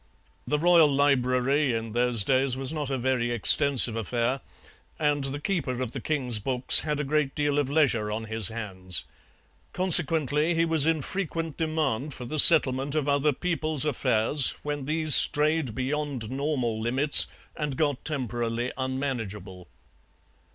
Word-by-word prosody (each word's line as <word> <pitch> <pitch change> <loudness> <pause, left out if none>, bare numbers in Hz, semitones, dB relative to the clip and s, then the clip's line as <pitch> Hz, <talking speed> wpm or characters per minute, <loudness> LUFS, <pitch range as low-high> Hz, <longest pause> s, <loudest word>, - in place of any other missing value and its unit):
The 150 - 0
royal 165 -1 +4
library 135 0 +1
in 115 0 -5
those 120 -2 0
days 130 +2 0
was 135 +2 -4
not 150 -3 -4
a 135 - -2
very 125 -1 -1
extensive 120 +1 +3
affair, 120 +4 -2 0.6
and 145 -2 -1
the 135 +1 -5
keeper 145 -7 -3
of 130 -3 -4
the 135 - -7
king's 125 -7 -2
books 125 +3 +4
had 150 -2 -3
a - - -1
great 150 -1 -2
deal 145 -1 -1
of 140 -2 -2
leisure 135 -8 +1
on 110 +1 -4
his 110 -2 -3
hands. 95 -5 -6 0.7
Consequently 160 -3 +2
he 165 0 +1
was 160 -2 +1
in 160 -3 0
frequent 165 -4 -5
demand 155 -4 -3
for 125 - -8
the 155 +5 -3
settlement 140 -3 +6
of 150 -2 -1
other 145 +1 +1
people's 155 -1 -2
affairs 130 -1 +2
when 145 -2 -5
these 155 0 -1
strayed 150 -5 +2
beyond 135 -3 -4
normal 130 -5 -3
limits 135 +6 +5 0.3
and 145 -4 -5
got 145 -4 -1
temporarily 120 -4 -3
unmanageable. 115 -9 -5
135 Hz, 150 wpm, -25 LUFS, 120-150 Hz, 0.7 s, settlement